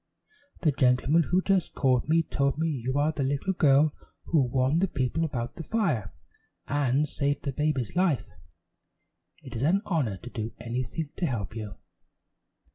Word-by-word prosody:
"The 155 - +3
gentleman 130 +4 +3
who 185 +1 +2
just 195 -3 +1
called 130 0 +2
me 165 +1 +4
told 140 -2 0
me 160 +1 0
you 130 -3 -2
are 150 +2 +2
the 155 - -4
little 140 +8 0
girl 150 -2 +4 0.3
who 160 -4 +2
warned 130 +5 +1
the 195 - +3
people 140 +1 -1
about 120 -6 -3
the 165 - -5
fire, 160 - 0 0.6
and 145 0 +1
saved 140 0 -1
the 140 - -1
baby's 140 -3 -1
life. 175 -7 +2 1.2
It - - -9
is 115 - -3
an 185 +9 +2
honor 140 - 0
to 120 - -10
do 110 -1 -4
anything 130 +6 -4
to 175 - 0
help 110 -5 -3
you." 105 -4 -6
140 Hz, 165 wpm, -27 LUFS, 125-160 Hz, 1.2 s, me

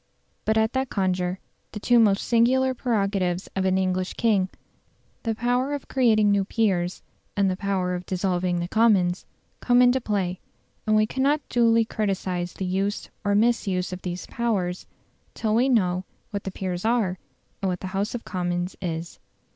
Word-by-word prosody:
But 220 0 +2
at 220 0 +2
that 265 -1 -1
conjuncture 185 -2 0 0.4
the 210 - -5
two 240 +3 +4
most 205 -3 +4
singular 260 +3 +3
prerogatives 195 -7 0
of 190 -1 0
an 190 0 +2
English 185 -1 -1
king 205 -5 +2 0.7
the 225 -1 -1
power 245 +5 0
of 285 - -8
creating 220 -5 +3
new 200 -1 +3
peers 190 -4 0 0.3
and 195 -1 +3
the - - -1
power 190 -2 -1
of 180 0 -5
dissolving 180 -1 0
the 175 - -2
Commons 190 -4 +2 0.3
come 245 0 +3
into 250 +1 +5
play; 190 -5 -1 0.5
and 215 - +4
we 215 0 +4
cannot 275 +5 0
duly 230 -1 +4
criticise 185 -5 -2
the 190 - -4
use 195 +3 -2
or 205 -1 +1
misuse 200 -5 +1
of 180 - -6
these 180 0 -5
powers 195 -7 -2 0.5
till 215 -2 -1
we 245 +4 +3
know 185 -7 +2 0.3
what 200 -2 -4
the 195 - -3
peers 185 -2 -4
are 220 -6 +1 0.4
and 195 - 0
what 180 -1 -3
the - - -5
House 200 +5 -1
of 235 - -6
Commons 175 0 -2
is. 165 -1 -4
200 Hz, 170 wpm, -25 LUFS, 185-230 Hz, 0.7 s, into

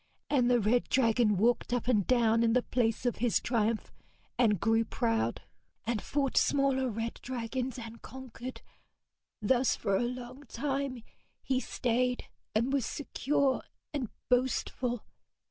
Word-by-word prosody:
And 250 -4 +4
the 245 -1 +4
red 230 +3 +2
dragon 230 -4 +3
walked 240 +6 +2
up 245 -1 0
and 215 -7 +2
down 230 -2 +4
in 230 -1 +3
the 250 0 +3
place 230 -1 0
of 245 - +1
his 240 -1 +2
triumph, 230 -2 0 0.4
and 210 -6 +3
grew 225 +3 +3
proud, 225 0 -1 0.4
and 225 -2 -1
fought 275 -2 -1
smaller 270 -2 +3
red 225 +1 -4
dragons 250 +1 -3
and 230 -1 -8
conquered. 255 0 -8 0.8
Thus 250 +4 +3
for 195 - 0
a - - +2
long 250 +3 -5
time 270 -2 -2 0.4
he 260 -1 +1
stayed, 250 0 0 0.3
and 235 +5 +2
was 275 -3 +2
secure 280 0 0 0.3
and 265 -7 -2 0.2
boastful. 250 -1 0
245 Hz, 140 wpm, -31 LUFS, 230-260 Hz, 0.8 s, And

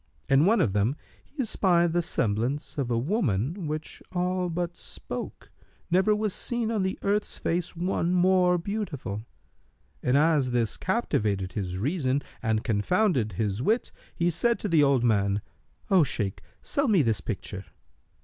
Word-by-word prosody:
In 135 +5 +4
one 225 +3 +4
of 100 - +1
them 105 +7 +1 0.3
he 280 -2 -4
espied 175 -6 +2
the 175 - +2
semblance 130 +3 -1
of 130 -3 -1
a 120 - +1
woman 150 - 0
which 155 +1 -5
all 180 0 0
but 175 +1 -3
spoke, - - -7 0.4
never 190 +4 +4
was 210 -2 -1
seen 235 -2 -1
on 215 -3 0
the 190 0 -1
earth's 205 +1 0
face 175 +1 -2
one 175 0 0
more 180 0 +4
beautiful; 165 - -4 0.8
and 125 +2 +2
as 150 -3 +3
this 120 -3 0
captivated 105 - -1
his 90 -3 -3
reason 140 - 0 0.2
and 110 -2 0
confounded 120 - +1
his 105 +2 -1
wit, 225 - +1 0.2
he 170 +1 +1
said 235 +8 +1
to - - -3
the 165 -5 +4
old 140 -4 +3
man, 100 -3 +2 0.5
"O 190 -2 +6
Shaykh, 105 -9 -1 0.2
sell 280 0 0
me 195 -9 +4
this 110 -7 +1
picture." 95 +3 -5
160 Hz, 155 wpm, -27 LUFS, 115-185 Hz, 0.8 s, O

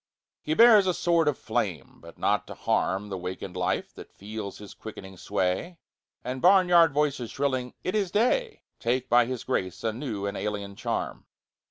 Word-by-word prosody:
He 155 - -1
bears 220 -3 +7
a 180 - +1
sword 170 -2 +2
of 150 - +1
flame 95 - -3
but - - -13
not - - 0
to - - -8
harm 100 +2 0
The 95 -2 -4
wakened 90 0 -6
life 90 0 -1
that - - -12
feels 105 0 -7
his 105 -1 -11
quickening 95 -3 -10
sway 95 - -2 0.5
And 130 +1 -4
barnyard 180 -3 +6
voices 140 -5 0
shrilling 130 -3 -2
"It 185 - -2
is 205 -4 0
day!" 420 - +1 0.2
Take 125 +2 -1
by 120 0 +5
his 130 -2 -4
grace 95 -8 -2
a 110 -1 0
new 110 -5 -4
and 100 0 -3
alien 100 -1 -4
charm. - - -4
125 Hz, 175 wpm, -27 LUFS, 100-170 Hz, 0.5 s, bears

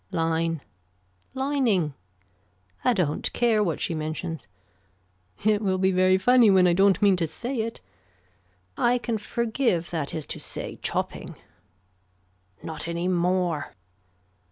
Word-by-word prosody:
Line. 165 -2 0 0.7
Lining. 255 - +1 0.9
I 250 - +4
don't 180 -10 0
care 225 -3 +3
what 170 -6 -1
she - - -1
mentions. 155 - -4 1.0
It 215 -1 +3
will 190 -3 +1
be 190 +1 +2
very 185 0 +4
funny 240 +3 +5
when 190 -2 +5
I 175 - +4
don't 195 0 +4
mean 200 -2 +5
to 165 -2 0
say 240 - -4
it. 225 +1 -3 0.9
I 245 +1 +2
can 235 -2 -2
forgive 225 -5 -1
that 160 -3 -3
is 155 -2 -4
to - - -9
say - - -5
chopping. - - -3 1.3
Not 160 0 -5
any 170 +1 -2
more. 180 -3 0
185 Hz, 130 wpm, -25 LUFS, 165-220 Hz, 1.3 s, funny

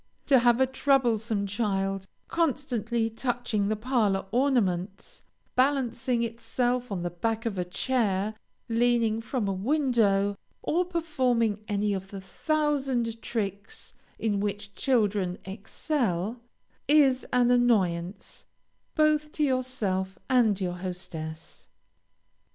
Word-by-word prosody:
To 270 -3 +5
have 240 0 +4
a 265 - +5
troublesome 235 -6 +1
child 195 -2 -1 0.2
constantly 245 - 0
touching 225 -3 -1
the 215 - +1
parlor 215 -4 +1
ornaments, 205 -7 0 0.3
balancing 255 -2 +1
itself 245 +1 -1
on 180 -3 -2
the 175 - -2
back 225 +6 -2
of 205 -5 -2
a - - +1
chair, 205 +1 0 0.3
leaning 230 -1 +2
from 225 -1 -2
a 195 - 0
window, 205 -4 +1 0.2
or 355 +3 +1
performing 255 - 0
any 205 -1 0
of 190 -1 -4
the 195 0 -8
thousand 265 -1 -1
tricks 205 - -4 0.2
in 210 -3 0
which 200 0 -3
children 205 -6 +1
excel, 215 - -2 0.5
is 275 -3 +4
an 245 -1 +4
annoyance, 195 -7 +1 0.5
both 305 -1 +2
to 305 - 0
yourself 220 -9 -1
and 230 -6 +3
your 180 -2 -2
hostess. 165 -3 -7
225 Hz, 110 wpm, -27 LUFS, 195-255 Hz, 0.5 s, To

